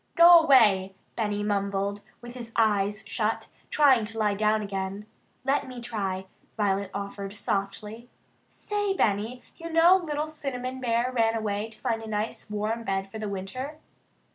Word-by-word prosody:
"Go 340 0 +9
away!" 210 -11 +4 0.2
Benny 210 -2 -1
mumbled 200 0 -1 0.2
with 240 0 -9
his 235 -2 -8
eyes 210 -1 +2
shut, 220 -1 -2 0.2
trying 270 -6 +5
to 225 +1 -7
lie 210 -2 +2
down 215 +1 +1
again. 195 0 -4 0.4
"Let 275 +1 +1
me 255 -1 -8
try," 195 -5 -3 0.3
Violet 200 -2 0
offered 200 0 -5
softly. 210 +3 -4 0.4
"Say, 410 -2 -2
Benny, 220 - 0
you 335 0 -7
know 330 +3 +6
little 305 -4 -2
Cinnamon 260 -4 -5
Bear 240 +1 +1
ran 225 -2 +2
away 210 0 -2
to 220 - -14
find 230 -2 -2
a 225 - -8
nice 215 +1 -3
warm 215 +2 -2
bed 195 -2 -2
for 220 - -7
the 215 -1 -3
winter? 225 +10 -5
220 Hz, 155 wpm, -27 LUFS, 200-255 Hz, 0.4 s, Go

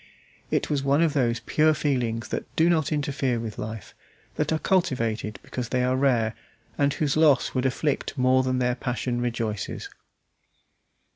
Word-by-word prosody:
It - - 0
was 145 -2 0
one 140 +4 +3
of 160 -3 +2
those 120 -4 +1
pure 155 0 +3
feelings 120 -7 -1
that - - -3
do 165 +2 +4
not 160 -3 +1
interfere 140 -5 0
with 115 -2 -6
life, 110 -2 -6 0.4
that - - -1
are 160 - +2
cultivated 115 - 0
because 125 -2 -5
they 125 -1 +1
are 125 +1 +2
rare, 125 -5 +2 0.4
and 140 0 +2
whose 145 -1 0
loss 155 -3 +4
would 130 0 +1
afflict 145 +2 -2
more 130 0 +4
than 130 0 0
their 125 -1 +1
passion 125 0 -2
rejoices. 115 -4 -3
130 Hz, 160 wpm, -25 LUFS, 120-145 Hz, 0.4 s, do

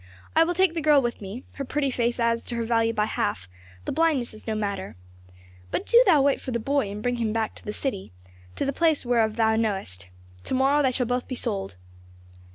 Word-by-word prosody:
"I 325 - +6
will 350 +2 -1
take 375 -2 +3
the 330 - -2
girl 300 -2 +5
with 240 -4 -2
me, 200 +6 -7
her 280 - -3
pretty 275 0 -1
face 240 0 -1
adds 230 0 +1
to 240 - -5
her 235 - -1
value 230 0 +2
by 210 -2 0
half, 100 - -2 0.4
the - - -2
blindness 305 -8 +1
is 215 - -14
no 220 - -1
matter. 200 -2 -3 0.7
But - - -2
do 475 +1 +6
thou 305 -7 +6
wait 280 -1 +2
for - - -6
the 235 - 0
boy 275 -1 0
and 205 +1 -6
bring 245 0 0
him 225 -2 -1
to 225 -1 -2
the 210 - -4
city, 210 -5 -4 0.4
to - - -1
the 275 - -1
place 320 -2 +2
whereof 230 -3 +2
thou 220 -1 +3
knowest. 190 - -2 0.4
To - - -1
morrow 275 +3 +3
they 265 -2 +2
shall 250 0 -1
both 245 +1 -2
be 255 - -4
sold." 95 - -3
240 Hz, 225 wpm, -25 LUFS, 215-275 Hz, 0.7 s, I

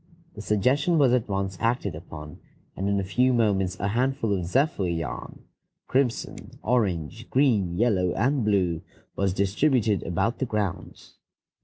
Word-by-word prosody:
The 105 - -8
suggestion 130 - +2
was 135 -5 +4
at 125 -4 +1
once 95 -1 -2
acted 115 - 0
upon, 75 -2 -9 0.4
and 95 +2 -2
in 100 0 +1
a - - -1
few 125 +7 +2
moments 95 -6 +1
a 100 - -1
handful 125 -1 0
of 90 -3 -1
zephyr 130 - +1
yarn, 80 -4 -5 0.4
crimson, 130 -3 -1
orange, 110 -3 -1
green, 105 -11 +2
yellow, 100 -6 +2
and 130 +4 +1
blue, 90 -6 +1 0.3
was 100 -1 +1
distributed 105 - +1
about 95 +8 -1
the 130 - -1
grounds. 100 -3 -4
100 Hz, 145 wpm, -26 LUFS, 95-125 Hz, 0.4 s, was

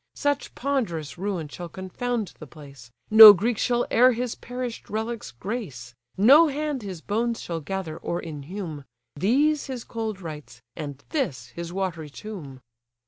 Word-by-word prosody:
Such 285 -1 -1
ponderous 210 - -2
ruin 185 -5 -2
shall 175 +4 -8
confound 205 +3 -4
the 155 - -9
place, 140 -5 -13 0.2
No 220 -1 +13
Greeks 215 +4 -1
shall 240 -1 +1
e'er 250 +2 +6
his 240 0 -2
perish'd 245 -1 -6
relics 220 +1 -4
grace, 135 - -6 0.2
No 275 - +7
hand 295 -2 -2
his 190 -5 -7
bones 230 +4 -1
shall 170 -1 -4
gather, 165 -1 -4
or 170 - -3
inhume; 155 0 -7 0.3
These 280 - +2
his 255 -3 -5
cold 220 -4 -4
rites, 150 -8 -9 0.2
and 145 -3 -7
this 135 - -2
his 170 +6 -7
watery 175 -5 -3
tomb." 145 -6 -9
195 Hz, 145 wpm, -25 LUFS, 155-240 Hz, 0.3 s, No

